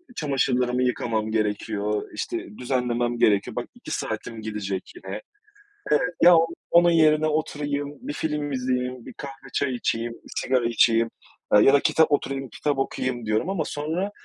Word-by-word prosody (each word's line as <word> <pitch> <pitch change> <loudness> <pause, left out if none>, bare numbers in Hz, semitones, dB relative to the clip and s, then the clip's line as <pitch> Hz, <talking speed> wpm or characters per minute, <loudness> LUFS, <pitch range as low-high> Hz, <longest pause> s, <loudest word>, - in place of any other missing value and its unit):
çamaşırlarımı 125 - +1
yıkamam 115 -3 -1
gerekiyor, 105 -1 -1
işte 105 - -5
düzenlemem 120 -1 -1
gerekiyor, 100 -4 +3
bak - - -3
2 - - -10
saatim 115 -1 -4
gidecek 105 -3 -4
yine. 355 - -7 1.0
Ya 175 0 +9 0.4
onun 175 0 +6
yerine 155 -1 +4
oturayım, 145 -2 -2
bir 285 +4 -5
film 150 - -2
izleyeyim, 125 -1 -2
bir - - -9
kahve 135 -2 -9
çay 135 -3 0
içeyim, 115 -1 -1
bir - - -16
sigara 125 -2 +1
içeyim, 115 0 +3 0.4
aaa, 105 - +7
ya 135 - +6
da 140 - +7
kitap 160 +2 +3
oturayım 135 -2 -1
kitap 145 +4 -1
okuyayım 130 -3 -2
diyorum 110 - 0
ama 190 -5 0
sonra 160 +8 -2
125 Hz, 145 wpm, -25 LUFS, 115-150 Hz, 1.0 s, Ya